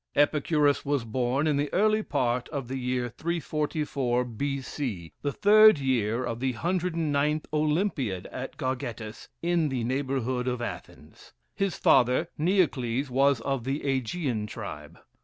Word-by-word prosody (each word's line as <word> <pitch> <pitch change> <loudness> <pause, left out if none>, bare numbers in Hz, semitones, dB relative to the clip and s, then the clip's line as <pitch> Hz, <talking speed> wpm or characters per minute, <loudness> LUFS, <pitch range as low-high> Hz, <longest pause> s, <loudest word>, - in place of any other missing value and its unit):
Epicurus 145 -1 +2
was 140 -3 0
born 125 +5 0
in 150 -2 +2
the 145 0 -1
early 215 +3 +3
part 125 - -1
of 140 -5 -4
the 130 +1 -4
year 125 -1 -1
344, 150 -4 -1
B. 135 +4 -3
C, 110 - -5
the 145 - -1
third 215 +3 +7
year 125 -4 0
of 115 -2 -3
the 130 0 0
109th 155 -1 0
Olympiad, 150 - 0
at 130 +1 -6
Gargettus, 125 -5 -4 0.2
in 170 -3 +2
the 130 -3 -2
neighborhood 130 -1 -1
of 125 -1 -1
Athens. 75 - -8 0.2
His 195 -6 -1
father, 130 +6 +3
Neocles, 140 -7 +1
was 135 -1 +3
of 135 -1 -2
the 135 +4 -2
Ægean 130 -4 -1
tribe. - - -8
135 Hz, 140 wpm, -27 LUFS, 125-155 Hz, 0.2 s, third